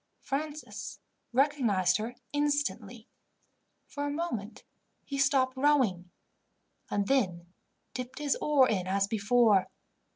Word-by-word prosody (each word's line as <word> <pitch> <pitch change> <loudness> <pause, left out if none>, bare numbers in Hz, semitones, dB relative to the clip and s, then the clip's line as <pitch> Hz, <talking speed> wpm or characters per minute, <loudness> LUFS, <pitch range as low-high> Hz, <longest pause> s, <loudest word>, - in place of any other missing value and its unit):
Francis 300 +2 -5 0.3
recognized 235 -9 +2
her 225 +3 -5 0.2
instantly. 290 0 -1 0.8
For 285 0 -4
a - - -1
moment 285 -9 -4 0.4
he 275 -1 -4
stopped 260 -1 +3
rowing, 260 -11 +2 0.8
and 200 -1 0
then 180 -10 0 0.4
dipped 250 0 -6
his 295 -2 0
oar 285 -4 +4
in 185 -5 -1
as 195 +1 +2
before. 210 -1 +3
255 Hz, 105 wpm, -30 LUFS, 200-285 Hz, 0.8 s, oar